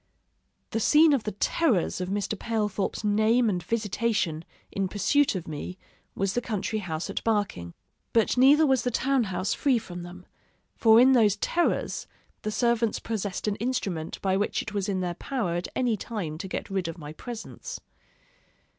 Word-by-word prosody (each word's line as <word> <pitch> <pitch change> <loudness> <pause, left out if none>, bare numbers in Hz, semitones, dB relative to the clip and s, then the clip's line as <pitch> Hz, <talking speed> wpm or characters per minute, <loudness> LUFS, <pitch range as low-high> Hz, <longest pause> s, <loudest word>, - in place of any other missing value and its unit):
The 225 - 0
scene 305 +6 +6
of 265 -6 0
the 215 - -1
terrors 205 - +1
of 180 - -3
Mr. 205 +2 -1
Palethorp's 210 -2 -2
name 215 +2 +3
and 180 -2 -2
visitation, 210 -5 -1 0.3
in 195 -1 -1
pursuit 210 +8 +2
of 180 - -4
me, 160 +4 -6 0.4
was 195 0 0
the 245 - 0
country 215 -1 -2
house 165 -3 -4
at - - -4
Barking; 205 - -1 0.4
but 225 -2 +3
neither 280 +5 +6
was 265 -3 +3
the 250 - 0
town 260 0 +1
house 190 0 -1
free 270 -4 +2
from 180 -6 -7
them; 180 +1 -10 0.5
for 225 0 +6
in 255 +2 +7
those 220 -6 +5
terrors, 340 +11 0 0.3
the 215 - -2
servants 235 0 +1
possessed 210 -3 -3
an 205 - 0
instrument 195 -9 -2
by 190 -1 +2
which 205 +2 0
it 215 - -7
was 200 0 -1
in 190 -2 0
their 175 -1 -1
power 210 -1 -2
at 175 +1 -2
any 245 -3 +1
time 185 -8 -5
to 190 - -5
get 190 - -5
rid 190 -3 -1
of 165 - -5
my 150 -2 -8
presence. 240 - -7
210 Hz, 175 wpm, -27 LUFS, 185-235 Hz, 0.5 s, in